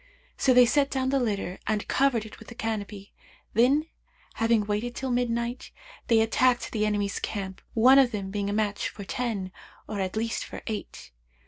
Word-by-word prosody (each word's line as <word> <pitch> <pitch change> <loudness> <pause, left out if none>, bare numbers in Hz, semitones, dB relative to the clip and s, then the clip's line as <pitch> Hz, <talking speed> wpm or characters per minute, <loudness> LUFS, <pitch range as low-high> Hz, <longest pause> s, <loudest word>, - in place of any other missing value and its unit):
So 265 - +2
they 250 0 +7
set 280 +3 +2
down 260 -1 -1
the 275 0 +2
litter 200 -6 -2
and 215 -1 -1
covered 255 -5 +2
it 220 - -12
with 220 - -13
the 235 - -10
canopy; 210 -3 -5 0.4
then, 265 +7 +4 0.5
having 225 -2 +2
waited 215 +4 -2
till 265 -1 -3
midnight, 240 0 -1 0.4
they 225 -1 +5
attacked 240 +2 +2
the 215 -1 0
enemy's 205 -1 -1
camp 190 -3 -5
one 255 +4 +7
of 265 -3 +5
them 200 -4 -4
being 200 0 -2
a - - -1
match 210 -1 0
for 205 - -9
ten; 200 -3 -3 0.4
or 210 -2 -4
at 190 0 -2
least 225 +1 -1
for - - -9
eight. 215 -2 -6
225 Hz, 185 wpm, -27 LUFS, 205-245 Hz, 0.5 s, they